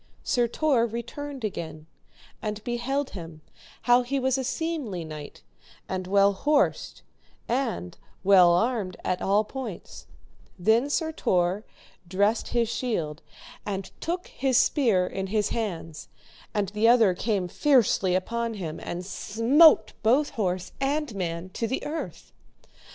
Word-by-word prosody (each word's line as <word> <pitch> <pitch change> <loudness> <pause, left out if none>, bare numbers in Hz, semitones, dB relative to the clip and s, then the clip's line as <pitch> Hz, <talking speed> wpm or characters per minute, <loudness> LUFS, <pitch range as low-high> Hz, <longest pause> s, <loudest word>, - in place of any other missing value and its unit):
Sir 240 -1 +2
Tor 245 -2 +2
returned 250 +4 -6
again, 160 -6 -5 0.6
and 210 -1 -4
beheld 260 +4 -2
him 165 -4 -9 0.4
how 245 +1 +5
he 270 +3 -2
was 260 -1 +1
a 265 - -1
seemly 265 - -3
knight 155 -2 -9 0.4
and 185 -1 -4
well 200 +1 +4
horsed, 285 +7 0 0.4
and 230 -8 -2 0.2
well 185 -3 +7
armed 200 0 0
at 185 - -1
all 205 +2 +3
points; 230 -5 -8 0.5
then 225 +9 +3
Sir 320 +2 0
Tor 185 - 0 0.4
dressed 200 +5 +1
his 235 -1 +1
shield, 170 - -2 0.4
and 195 -2 -4
took 355 +2 -2
his 265 -2 +1
spear 230 - +3
in 190 +1 -4
his 210 +1 0
hands, 170 -8 -4 0.4
and 205 -3 -1
the 210 +2 +2
other 230 -5 +6
came 195 -1 -1
fiercely 220 - +3
upon 230 +4 -2
him, 165 -6 -5
and 175 +1 -5
smote 230 - +4
both 260 +7 +3
horse 185 -4 -2
and 285 -1 0
man 175 -2 -4
to 230 +5 -3
the 260 - -3
earth. 315 +2 -6
220 Hz, 135 wpm, -26 LUFS, 185-255 Hz, 0.6 s, well